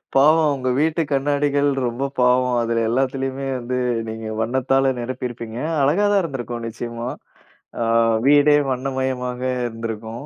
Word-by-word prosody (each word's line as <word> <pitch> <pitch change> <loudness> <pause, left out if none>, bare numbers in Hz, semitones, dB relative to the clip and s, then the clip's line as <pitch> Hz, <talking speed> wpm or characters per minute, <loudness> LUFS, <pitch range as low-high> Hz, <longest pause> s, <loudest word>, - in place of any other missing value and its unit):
பாவம். 155 +2 +5
உங்க 130 -1 -2
வீட்டு 160 +2 +1
கண்ணாடிகள் 145 +1 +1 0.2
ரொம்ப 130 +4 -3
பாவம். 125 0 +3
அதில 115 0 0
எல்லாத்திலயுமே 135 +2 -1
வந்து 125 +1 -3 0.3
நீங்க 110 0 -6
வண்ணத்தால 130 +3 +1
நிரப்பி 125 +1 -3
இருப்பீங்க! 115 -1 -8 0.2
அழகா 155 +10 +3
தான் 200 - +4
இருந்திருக்கும். 120 -6 -5
நிச்சயமா. 120 +1 -5 0.7
ஆ - - +2 0.4
வீடே 145 +1 +6
வண்ணமயமாக 130 -1 -2 0.3
இருந்திருக்கும். 115 +2 -6
130 Hz, 125 wpm, -21 LUFS, 120-140 Hz, 0.7 s, வீடே